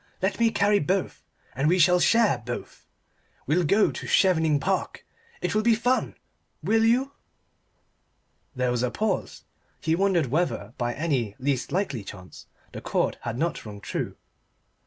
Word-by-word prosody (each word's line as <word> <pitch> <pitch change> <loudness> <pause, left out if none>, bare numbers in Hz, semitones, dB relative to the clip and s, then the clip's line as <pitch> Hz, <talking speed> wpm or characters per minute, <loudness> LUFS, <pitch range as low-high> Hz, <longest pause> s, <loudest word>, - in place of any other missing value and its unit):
Let 190 +2 -1
me 230 -1 +4
carry 205 -1 +2
both, 185 +5 -1 0.3
and 135 +4 +1
we 180 +2 +3
will 180 0 +3
share 230 - +3
both. 120 +1 -7 0.6
We'll 165 +6 +2
go 200 +7 +3
to - - -7
Chevening 160 -6 +3
Park. 135 - -2 0.4
It 180 - 0
will 215 - +2
be 230 0 +4
fun. 245 +3 0 0.5
Will 225 0 +3
you?" 250 +4 +2 1.4
There 125 -1 0
was 120 -1 0
a 125 - +1
pause: 210 - -2 0.4
he 160 - 0
wondered 185 -3 +2
whether 145 - -1
by 120 -1 -1
any 135 -10 -1
least 135 -1 -1
likely 155 - -1
chance 90 -2 -11 0.2
the - - -8
chord - - -1
had 115 - -4
not 165 +2 -2
rung 105 -2 -9
true. - - -4
170 Hz, 155 wpm, -26 LUFS, 125-205 Hz, 1.4 s, me